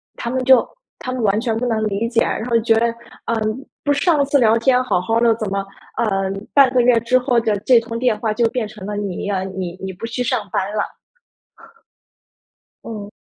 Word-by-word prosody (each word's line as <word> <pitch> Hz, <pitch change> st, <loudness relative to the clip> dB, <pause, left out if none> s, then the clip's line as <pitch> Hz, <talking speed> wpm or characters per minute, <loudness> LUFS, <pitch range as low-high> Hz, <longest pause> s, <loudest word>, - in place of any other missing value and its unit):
他 235 Hz, -, -4 dB
们 260 Hz, +1 st, -1 dB
就 260 Hz, -1 st, +6 dB, 0.3 s
他 255 Hz, -, -5 dB
们 255 Hz, -3 st, -3 dB
完 205 Hz, +1 st, +2 dB
全 225 Hz, -2 st, -1 dB
不 245 Hz, -, -2 dB
能 225 Hz, -3 st, 0 dB
理 210 Hz, +3 st, -1 dB
解， 230 Hz, -1 st, +1 dB
然 220 Hz, -, -1 dB
后 240 Hz, -1 st, 0 dB
就 225 Hz, 0 st, +2 dB
觉 -, -, +3 dB
得， 235 Hz, -, +2 dB, 0.4 s
嗯， 225 Hz, +3 st, -2 dB, 0.2 s
不 290 Hz, -, +1 dB
是 285 Hz, -, +1 dB
上 310 Hz, -5 st, +3 dB
次 285 Hz, +1 st, +2 dB
聊 225 Hz, -3 st, +4 dB
天 250 Hz, +1 st, +3 dB
好 180 Hz, -8 st, 0 dB
好 225 Hz, +5 st, 0 dB
的， 235 Hz, -1 st, +4 dB
怎 215 Hz, -3 st, -4 dB
么， 195 Hz, 0 st, -2 dB, 0.3 s
呃， 195 Hz, -4 st, 0 dB, 0.2 s
半 275 Hz, -3 st, +6 dB
个 250 Hz, -, +5 dB
月 240 Hz, -1 st, +4 dB
之 235 Hz, +3 st, +2 dB
后 250 Hz, -1 st, +2 dB
的 220 Hz, -3 st, 0 dB
这 245 Hz, 0 st, +5 dB
通 230 Hz, 0 st, -6 dB
电 240 Hz, -3 st, +1 dB
话 220 Hz, 0 st, -1 dB
就 230 Hz, +2 st, +1 dB
变 240 Hz, -3 st, -2 dB
成 210 Hz, -2 st, -10 dB
了 210 Hz, -, -4 dB
你 200 Hz, -3 st, -4 dB
呀， 195 Hz, -2 st, -1 dB
你 190 Hz, -2 st, -5 dB
你 190 Hz, 0 st, -4 dB
不 185 Hz, +4 st, -7 dB
去 235 Hz, +2 st, -4 dB
上 230 Hz, -4 st, -1 dB
班 -, -, +1 dB
了。 210 Hz, -, -3 dB, 1.9 s
嗯。 210 Hz, -3 st, -7 dB
230 Hz, 240 characters per minute, -19 LUFS, 210-250 Hz, 1.9 s, 就